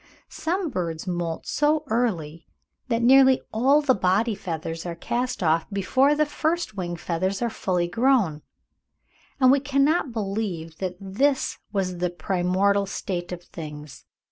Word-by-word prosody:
Some 345 0 -2
birds 170 -6 -3
moult 175 -3 -3
so 300 +1 +1
early, 180 - -1 0.4
that 235 -2 0
nearly 265 +1 +6
all 270 +7 +4
the 270 -3 +4
body 205 +3 +1
feathers 165 -3 -5
are 175 -1 -5
cast 245 +5 -2
off 160 0 +2
before 260 +9 +2
the 305 +1 +2
first 315 -3 -2
wing 175 -3 -3
feathers 180 +3 -2
are 235 -1 -1
fully 180 -4 -1
grown; 210 - +2 1.0
and 255 -1 +6
we 280 - +4
cannot 285 +1 +1
believe 195 -7 -4
that 185 -2 -3
this 260 +9 0
was 185 -3 -2
the 180 0 0
primordial 190 +3 +1
state 180 -2 -4
of 175 -1 -6
things. 150 -4 -9
195 Hz, 140 wpm, -24 LUFS, 175-260 Hz, 1.0 s, nearly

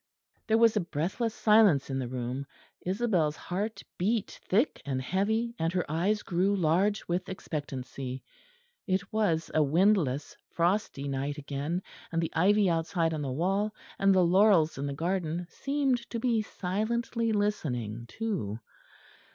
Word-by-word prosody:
There 220 0 +4
was 230 -1 +5
a - - +3
breathless 190 +7 -2
silence 210 -11 +4
in 135 - -1
the 130 - -2
room; 125 +2 -4 0.4
Isabel's 185 -6 +1
heart 205 +8 -4 0.2
beat 210 +4 0
thick 225 +10 +2
and 135 -2 -2
heavy 215 - 0
and 165 +1 +1
her 180 -2 0
eyes 185 +7 0
grew 190 +3 +1
large 190 +4 +1
with 180 +2 -2
expectancy; 135 -7 -5 0.6
it 190 +2 -1
was 175 -7 +1
a 155 - +4
windless 155 -2 +2
frosty 170 -5 0
night 140 +2 -2
again, 150 +5 -3 0.3
and 165 - 0
the 165 - -2
ivy 200 +5 +4
outside 165 -1 +1
on 155 - -2
the 135 -2 -2
wall, 195 +9 0 0.2
and 195 0 +5
the 185 -1 +5
laurels 185 -3 +4
in 140 - -2
the 140 - -3
garden 175 +1 -1
seemed 275 -2 0
to 235 - -3
be 230 -2 +2
silently 225 +4 -1
listening 125 - -1
too. 170 - -3
180 Hz, 145 wpm, -29 LUFS, 150-210 Hz, 0.6 s, was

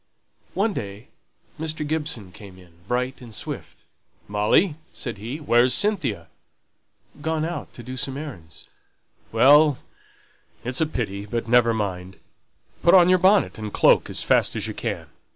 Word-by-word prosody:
One 205 +2 +1
day 100 - -7 0.5
Mr. 155 -1 -3
Gibson 150 - -3
came 95 -1 -13
in, 90 -2 -17 0.2
bright 125 +2 -2
and 115 -3 -10
swift. - - -7 0.4
"Molly," 105 - +2 0.2
said 120 -6 -6
he, 115 +7 -5
"where's 125 -4 +3
Cynthia?" 210 -2 -1 1.0
"Gone 160 0 -1
out 165 -5 -5
to 120 - -9
do 130 +2 -7
some 135 +1 -3
errands 105 - -9 0.3
" - - -38
"Well, 145 +5 +6 0.9
it's 125 +5 -1
a 160 - +2
pity 105 -8 -4
but 115 +1 -3
never 120 0 +4
mind. 95 -4 -4 0.6
Put 170 - +6
on 180 -1 +7
your 185 0 +5
bonnet 190 - +3
and 105 -1 -5
cloak - - +4
as - - -2
fast - - +2
as - - -2
you - - -4
can. - - -4
125 Hz, 150 wpm, -23 LUFS, 105-155 Hz, 1.0 s, on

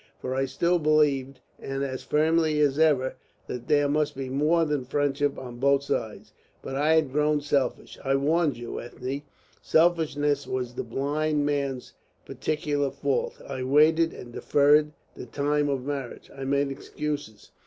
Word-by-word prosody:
For 130 - -4
I 135 +1 +1
still 170 +7 +1
believed, 140 -4 +2 0.2
and 135 0 -4
as 130 -2 -4
firmly 155 0 +2
as 145 -1 +2
ever, 140 -5 +3 0.3
that 125 -1 -6
there 145 -1 +3
must 150 +1 0
be 135 -1 -5
more 155 +5 +2
than 150 -3 -1
friendship 145 +1 0
on 125 -2 -8
both 140 +1 +3
sides. 115 -5 -4 0.3
But 135 - -6
I 150 +3 +3
had 155 -4 +2
grown 150 +1 +2
selfish. 140 -3 -1
I 135 0 +1
warned 150 +1 +1
you, 120 0 -6
Ethne, 130 +3 -5 0.4
selfishness 160 -3 +2
was 125 -1 -3
the - - -3
blind 150 +2 -1
man's 140 -3 -2 0.3
particular 150 -2 -1
fault. 140 0 -2
I 135 -2 -5
waited 155 +5 +4
and 120 -1 -11
deferred 150 +3 +3 0.2
the - - -9
time 145 +3 0
of 135 -2 -2
marriage. 140 -3 -5
I 135 -1 -6
made 140 +1 +1
excuses. 145 -5 -6
145 Hz, 155 wpm, -26 LUFS, 135-150 Hz, 0.4 s, waited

